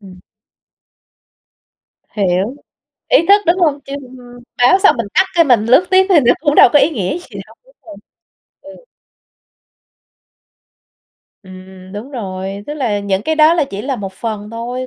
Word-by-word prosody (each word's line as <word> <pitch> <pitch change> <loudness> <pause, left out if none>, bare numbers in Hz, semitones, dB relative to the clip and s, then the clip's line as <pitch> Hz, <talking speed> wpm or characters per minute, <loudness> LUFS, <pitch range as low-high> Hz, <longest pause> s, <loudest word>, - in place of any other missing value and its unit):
Ừm. 185 -3 -15 1.9
Hiểu, 195 +3 -2 0.5
ý - - +5
thức, 405 +1 +5
đúng 340 +3 +2
hông? 300 -5 +1
Chứ 275 - -10 0.7
báo 245 +10 +4
xong 400 -5 +3
mình 230 -4 -3
tắt 375 - +4
cái 335 -1 +4
mình 245 -7 +2
lướt 260 +10 +3
tiếp 375 0 +4
thì 360 -6 +5
nó 245 -2 +3
cũng 295 -1 0
đâu - - +7
có 295 - +5
ý 290 - +2
nghĩa 215 - -3
gì 350 - -11
đâu. - - -19
Đúng - - -25
rồi, 315 - -11 0.7
ừ. 290 - -15 2.6
Ừm, 185 0 -14
đúng 210 +7 -8
rồi. 195 -5 -6
Tức 295 - -6
là 240 -8 -2
những 200 -1 -2
cái 315 - -1
đó 310 +1 +4
là 330 -3 +1
chỉ 200 +1 -6
là 270 0 -3
một 195 -3 -7
phần 210 +1 -6
thôi, 245 +3 -6
245 Hz, 165 wpm, -15 LUFS, 200-310 Hz, 2.6 s, đâu